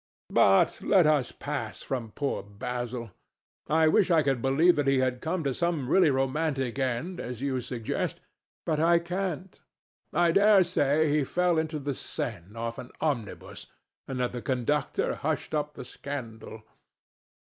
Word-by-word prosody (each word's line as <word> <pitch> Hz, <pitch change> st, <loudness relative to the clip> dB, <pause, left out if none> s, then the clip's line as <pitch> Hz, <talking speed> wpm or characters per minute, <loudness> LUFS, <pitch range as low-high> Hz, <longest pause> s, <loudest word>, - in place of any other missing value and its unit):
But 95 Hz, -1 st, +4 dB
let 190 Hz, -5 st, +4 dB
us 150 Hz, -5 st, +2 dB
pass -, -, -5 dB
from 120 Hz, -4 st, -3 dB
poor 140 Hz, -1 st, -2 dB
Basil. 120 Hz, +2 st, -5 dB, 0.6 s
I 160 Hz, +1 st, +4 dB
wish 190 Hz, +4 st, +4 dB
I 165 Hz, -3 st, +4 dB
could 135 Hz, -3 st, 0 dB
believe 155 Hz, +7 st, +4 dB
that 145 Hz, -2 st, +1 dB
he 135 Hz, 0 st, +4 dB
had 130 Hz, -1 st, 0 dB
come 165 Hz, +1 st, -2 dB
to 135 Hz, -2 st, 0 dB
such 170 Hz, +5 st, 0 dB
a -, -, -4 dB
really 155 Hz, +5 st, +3 dB
romantic 135 Hz, -1 st, -1 dB
end 130 Hz, +8 st, -2 dB
as 120 Hz, -1 st, -5 dB
you 130 Hz, -1 st, -1 dB
suggest, 120 Hz, -2 st, -3 dB, 0.5 s
but 155 Hz, -2 st, 0 dB
I 170 Hz, +2 st, +5 dB
can't. 180 Hz, +1 st, -4 dB, 0.5 s
I 170 Hz, +1 st, +3 dB
dare 200 Hz, +1 st, +6 dB
say 155 Hz, -3 st, +2 dB
he 150 Hz, -, +2 dB
fell 175 Hz, +3 st, +1 dB
into 160 Hz, 0 st, -2 dB
the 140 Hz, -1 st, -3 dB
Seine 105 Hz, -6 st, -5 dB
off 115 Hz, 0 st, -4 dB
an 125 Hz, -, -8 dB
omnibus 130 Hz, -10 st, -3 dB, 0.4 s
and 130 Hz, -1 st, -4 dB
that 125 Hz, -, 0 dB
the 125 Hz, -, -5 dB
conductor 130 Hz, +3 st, 0 dB
hushed 155 Hz, +2 st, -3 dB
up 150 Hz, -1 st, -2 dB
the -, -, -8 dB
scandal. 115 Hz, -6 st, -7 dB
140 Hz, 160 wpm, -28 LUFS, 125-160 Hz, 0.6 s, dare